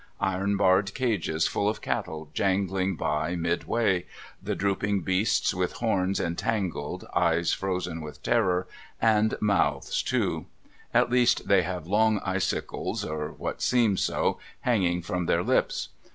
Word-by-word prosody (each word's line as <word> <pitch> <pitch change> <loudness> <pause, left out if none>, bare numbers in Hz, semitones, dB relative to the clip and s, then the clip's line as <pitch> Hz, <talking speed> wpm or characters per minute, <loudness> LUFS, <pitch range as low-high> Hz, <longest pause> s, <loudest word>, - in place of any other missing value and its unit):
Iron 100 +1 0
barred 95 +1 +3
cages 95 -11 0
full 100 - +1
of 110 - -3
cattle 80 -1 -4
jangling 95 0 0
by 80 +3 -1
midway, 90 +3 0 0.3
the - - -2
drooping 100 0 0
beasts 95 +3 +1
with 90 -1 -1
horns 100 -4 0
entangled, 95 +2 -2
eyes 85 +1 +2
frozen 90 -3 -2
with 75 -1 -9
terror, 95 -6 +2 0.3
and 110 -1 +3
mouths 105 -2 +1
too: - - -1 0.4
at - - +3
least 125 -1 +3
they 100 -2 +5
have 90 -1 -4
long 105 +3 +3
icicles 95 -1 -2
(or 75 -1 -3
what - - -5
seem 115 -5 +3
so) - - 0 0.2
hanging 90 -8 +1
from 90 -1 -2
their - - +2
lips. - - +1
95 Hz, 135 wpm, -27 LUFS, 90-105 Hz, 0.4 s, they